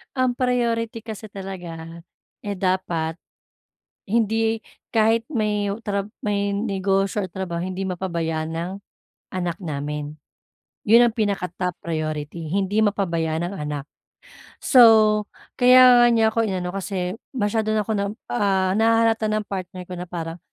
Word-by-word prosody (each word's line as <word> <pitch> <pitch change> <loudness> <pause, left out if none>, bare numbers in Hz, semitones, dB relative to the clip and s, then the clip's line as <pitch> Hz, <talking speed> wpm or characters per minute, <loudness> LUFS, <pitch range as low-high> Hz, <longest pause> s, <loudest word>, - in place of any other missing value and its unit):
Ang 255 -1 +1
priority 235 -3 0
kasi 220 -1 -8
talaga, 175 -5 -8 0.4
eh, 205 - -2
dapat, 180 -4 -1 0.9
hindi 225 0 +1 0.3
kahit 225 0 +3
may 210 -4 0 0.2
trab 200 0 -2 0.2
may 200 -1 0
negosyo 195 -1 0
o 185 - -6
trabaho 175 -3 -4
hindi 185 +1 -3
mapabayan 170 -3 -2
ang 175 +2 -3 0.6
anak 175 -2 -2
namin, 150 0 -4 0.7
'yun 235 +3 +7
ang 225 - -6
pinaka-top 180 -4 -1
priority. 155 0 -4
Hindi 200 +2 +1
mapabayaan 170 -4 0
ang - - -7
anak, 150 -2 -4 0.8
so, 220 -4 +6 0.3
kaya 250 -1 +8
nga - - +7
niya 225 -1 +4
ako 230 - +1
inano, 185 -2 -3
kasi 185 -1 -3 0.2
masyado 215 -1 0
na 215 - +2
ako 220 - -1
na, 200 -1 0 0.3
ah, 190 -4 +2
nahahalata 225 0 +3
ng 215 -1 -1
partner 185 -1 -6
ko 180 - -7
na 180 - -5
parang 165 -1 -5
195 Hz, 130 wpm, -23 LUFS, 175-220 Hz, 0.9 s, kaya